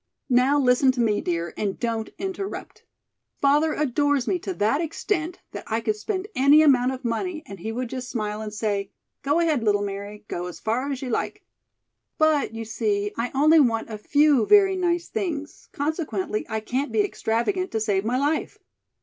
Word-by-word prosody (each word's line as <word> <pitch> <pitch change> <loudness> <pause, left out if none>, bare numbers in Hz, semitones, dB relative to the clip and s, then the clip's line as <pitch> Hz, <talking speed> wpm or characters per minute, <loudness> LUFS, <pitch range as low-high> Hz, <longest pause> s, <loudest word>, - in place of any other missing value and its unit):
"Now, 255 +4 +4
listen 260 -1 +4
to 250 - -6
me, 215 -3 +2
dear, 170 -1 -2
and 200 -2 -3
don't 230 -2 -2
interrupt. 390 +1 -6 0.5
Father 295 +3 +3
adores 290 -1 +1
me 365 - +1
to 380 - -4
that 225 +7 +1
extent 335 +1 -2
that - - -7
I 225 +1 0
could 220 -2 -1
spend 375 - -3
any 285 +4 +6
amount 260 -4 +4
of 260 -1 -7
money 310 +8 -2
and 195 -2 -10
he 220 +5 -4
would 250 +2 -3
just 255 +1 -6
smile 210 -2 -3
and 215 -1 -5
say: 205 -2 -2 0.3
'Go 290 +4 +1
ahead, 315 -6 +2
little 205 -2 +2
Mary, 200 +1 -6
go 175 +1 -4
as 180 - -8
far 250 +6 -1
as 270 -1 -4
you 255 - -4
like.' - - -2 0.7
But, 310 -7 +2
you 225 0 -5
see, 205 -2 -1
I 235 +2 -2
only 310 +4 +6
want 230 -4 +1
a 215 - -4
few 285 0 +3
very 390 -2 +6
nice 345 -2 0
things, 330 -9 -4
consequently, 280 - -2
I 220 0 -2
can't 260 +6 -2
be 415 - +2
extravagant 370 - -1
to 220 - -2
save 205 -3 0
my 240 +3 0
life." 290 +3 -1
255 Hz, 185 wpm, -24 LUFS, 220-310 Hz, 0.7 s, any